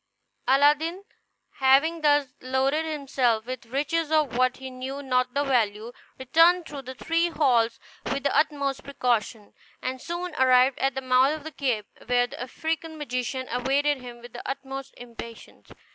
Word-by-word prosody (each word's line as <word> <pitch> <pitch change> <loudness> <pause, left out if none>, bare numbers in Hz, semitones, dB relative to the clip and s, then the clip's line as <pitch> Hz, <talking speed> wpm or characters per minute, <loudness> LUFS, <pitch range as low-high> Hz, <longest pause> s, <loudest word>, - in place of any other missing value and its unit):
Aladdin, 295 +7 +3 0.5
having 280 +5 +4
thus 290 -3 +3
loaded 265 +4 0
himself 265 -7 0
with 250 -2 -6
riches 300 +5 -1
of 305 -6 +2
which 255 0 +2
he 265 0 -8
knew 265 +2 -6
not 255 -1 0
the 285 - +2
value, 230 -4 0 0.3
returned 330 +7 +4
through 285 -3 -7
the 260 0 -9
three 330 +5 0
halls 240 -8 +2 0.3
with 275 0 -2
the 285 - +1
utmost 280 -3 +1
precaution, 235 -5 -1 0.3
and 255 0 -4
soon 345 0 -4
arrived 255 0 +5
at 270 0 0
the 265 - -2
mouth 260 +3 +3
of 310 - -9
the 315 - -7
cave, 245 -8 -1 0.2
where 245 0 +3
the 245 - -9
African 320 +5 -4
magician 260 -2 -3
awaited 275 +4 +1
him 240 -1 -10
with 240 - -12
the 240 - -7
utmost 270 0 -5
impatience. 235 -1 -11
265 Hz, 160 wpm, -26 LUFS, 250-295 Hz, 0.5 s, arrived